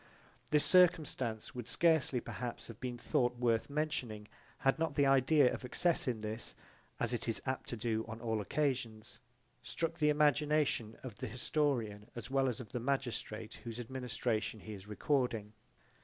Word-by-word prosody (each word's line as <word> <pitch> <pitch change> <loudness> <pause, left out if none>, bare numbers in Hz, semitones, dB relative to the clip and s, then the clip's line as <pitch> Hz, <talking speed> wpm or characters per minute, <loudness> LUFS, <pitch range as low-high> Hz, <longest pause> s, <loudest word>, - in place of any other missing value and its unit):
This 150 -1 +4
circumstance 150 - +3
would 120 -2 -6
scarcely 160 -6 +3
perhaps 120 0 -5
have 115 0 -9
been 125 -1 -4
thought 120 +1 +1
worth 115 -1 +1
mentioning, 130 -8 -2 0.3
had 135 +2 +2
not 160 -3 0
the 140 - +4
idea 135 0 +5
of - - -5
excess 170 +7 +1
in 120 -4 -1
this, 110 +2 -4 0.4
as 120 0 0
it 120 0 -3
is 115 - 0
apt 130 -1 -3
to 120 - -3
do 110 0 0
on 110 0 -6
all 110 -2 -1
occasions, 125 -3 -2 0.4
struck 165 +1 -3
the 150 -1 +4
imagination 150 -5 +2
of 120 -6 -7
the 130 - -4
historian 120 -4 -1
as 120 +2 -6
well 135 -1 +3
as 115 - -4
of 125 - -9
the 125 - -2
magistrate 120 -4 -3
whose 115 0 -6
administration 120 -3 -2
he 110 - -7
is 100 0 -10
recording. 115 -2 0
125 Hz, 165 wpm, -34 LUFS, 110-140 Hz, 0.4 s, idea